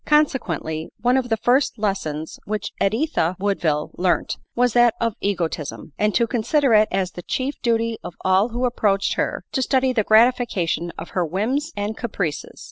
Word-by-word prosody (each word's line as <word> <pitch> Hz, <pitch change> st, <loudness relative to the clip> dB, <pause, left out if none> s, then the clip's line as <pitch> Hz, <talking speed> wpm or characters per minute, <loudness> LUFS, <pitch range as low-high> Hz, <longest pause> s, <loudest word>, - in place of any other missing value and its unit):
Consequently, 175 Hz, -, +1 dB
one 245 Hz, +2 st, +3 dB
of 260 Hz, -2 st, 0 dB
the 225 Hz, -, +1 dB
first 245 Hz, +3 st, +2 dB
lessons 175 Hz, -7 st, -3 dB
which 215 Hz, 0 st, -3 dB
Editha 215 Hz, -, +1 dB
Woodville 170 Hz, -7 st, 0 dB
learnt 180 Hz, 0 st, 0 dB, 0.2 s
was 245 Hz, -1 st, +2 dB
that 240 Hz, -1 st, +5 dB
of 230 Hz, -1 st, 0 dB
egotism, 165 Hz, -6 st, -3 dB
and 210 Hz, 0 st, 0 dB
to 235 Hz, -, +4 dB
consider 255 Hz, +3 st, +1 dB
it 215 Hz, 0 st, +6 dB
as 190 Hz, -1 st, 0 dB
the 175 Hz, -, -8 dB
chief 260 Hz, +9 st, -3 dB
duty 230 Hz, -1 st, 0 dB
of 175 Hz, -, -7 dB
all 190 Hz, +4 st, +3 dB
who 245 Hz, +2 st, -1 dB
approached 205 Hz, -5 st, +1 dB
her, -, -, -2 dB
to 265 Hz, -, 0 dB
study 260 Hz, 0 st, +2 dB
the 220 Hz, -3 st, +2 dB
gratification 215 Hz, -7 st, +2 dB
of 165 Hz, 0 st, -7 dB
her 180 Hz, -, 0 dB
whims 230 Hz, -, -1 dB
and 205 Hz, +2 st, -2 dB
caprices. 195 Hz, -10 st, -4 dB
215 Hz, 170 wpm, -22 LUFS, 185-245 Hz, 0.2 s, it